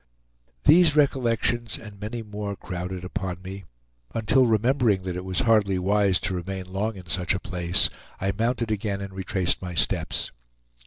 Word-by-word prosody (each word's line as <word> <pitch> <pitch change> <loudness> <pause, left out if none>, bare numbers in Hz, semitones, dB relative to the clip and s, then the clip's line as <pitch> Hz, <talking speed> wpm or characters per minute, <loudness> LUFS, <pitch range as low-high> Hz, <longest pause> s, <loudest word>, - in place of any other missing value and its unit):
These 160 0 +6
recollections, 120 -5 +1
and 105 -3 -11
many 110 +3 -4
more, 105 -1 -5
crowded 90 0 -5
upon 95 -1 -4
me, 95 0 -7 0.5
until 115 +4 +3
remembering 115 -3 +2
that 90 -1 -3
it 90 - -4
was 95 +6 0
hardly 105 -6 +3
wise 95 0 +2
to - - 0
remain 95 +1 -4
long 105 +3 -1
in 95 -2 -10
such 90 +3 0
a - - -2
place, 90 -3 +1 0.3
I 95 +1 0
mounted 115 +1 0
again 100 -1 -1
and 100 -1 -6
retraced 95 -1 -1
my 90 -2 -5
steps. - - 0
100 Hz, 160 wpm, -25 LUFS, 95-115 Hz, 0.5 s, These